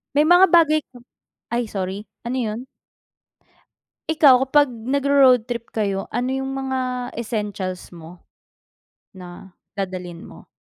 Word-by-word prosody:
May 295 - +5
mga 355 +3 +6
bagay 320 -3 +5
ka 255 - -16 0.6
ay 240 -1 -1
sorry, 195 +1 -5 0.2
ano 245 +2 -2
'yon? 225 +1 -3 1.4
Ikaw, 295 -5 +5
kapag 290 -1 +3
nagro-road 260 +1 +3
trip 235 -1 -5
kayo, 200 -3 -2
ano 245 +3 -2
yung 270 0 -3
mga 255 -2 -3
essentials 205 -6 -5
mo, 170 +1 -13 0.9
na 185 0 -12 0.2
dadalhin 185 -3 -5
mo? - - -14
240 Hz, 120 wpm, -21 LUFS, 195-270 Hz, 1.4 s, mga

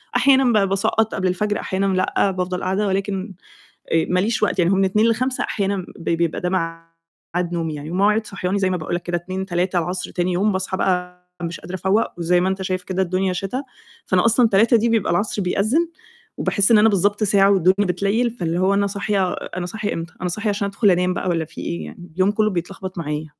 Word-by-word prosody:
أحيانًا 260 -1 +4
بقى 200 -2 +3
باسقّط 200 +3 0
قبل 190 -1 0
الفجر، 205 +3 -1
أحيانًا 190 +1 -1
لأ، 185 +1 +1
بافضل 180 0 -3
قاعدة 195 +3 0
ولكن، 195 +1 -2 0.6
آآ، 165 -1 +3
ماليش 210 +4 +1
وقت، 200 - +1
يعني 175 +2 +3
هو - - +3
من 195 0 +3
02:00 210 +4 +3
ل05:00 255 +3 0
أحيانًا 195 -2 -2
ب 165 - -4
بيبقى 170 -1 0
ده 180 - 0
مع 165 -2 -3 0.5
ميعاد 175 -1 -1
نومي 165 -2 -2
يعني، 150 +2 -7
ومواعيد 210 +4 +2
صحياني 195 0 -2
زي 190 - +1
ما 185 - 0
باقول 160 +2 -3
لك 175 - -3
كده 175 0 -1
14:00، 185 +2 -5
15:00 180 0 0
العصر 180 +2 -4
تاني 180 0 -1
يوم 205 +4 +2
باصحى 190 0 -2
بقى 180 -1 -1 0.2
مش 170 0 -4
قادرة 185 - -7
أفوّق، 190 +5 +1
وزي 175 +1 +2
ما 185 - +1
أنت 190 0 -2
شايف 185 -1 -2
كده 190 0 -2
الدنيا 185 0 0
شتا، 195 +9 -3 0.4
فأنا 185 +2 +2
أصلًا 235 +1 +4
15:00 225 +4 +5
دي 235 +2 +1
بيبقى 225 -6 +1
العصر 205 +3 0
بيأذِّن، 220 - +1 0.5
وباحس 200 +2 +1
إن 220 - +7
أنا 220 +1 +6
بالضبط 205 +2 +1
ساعة 200 -1 +4
والدنيا 190 +1 +3
بتليّل، 210 +6 +1
فاللي 175 -6 -2
هو 190 +1 +3
أنا 200 0 +2
صاحية 200 -2 -1
أنا 180 0 -5
صاحية 210 +2 -3
امتى؟ 165 +1 -6
أنا 180 - -1
صاحية 215 +4 -2
عشان 200 0 -1
أدخل 200 +1 +2
أنام 180 +1 +1
بقى - - -2
والَّا 165 -2 0
في - - -10
إيه 85 -2 -4
يعني! 175 - -11
اليوم 190 +2 +3
كُلّه 215 0 +1
بيتلخبط 185 +1 -5
معايا. 150 -1 -3
190 Hz, 220 wpm, -21 LUFS, 180-205 Hz, 0.6 s, إن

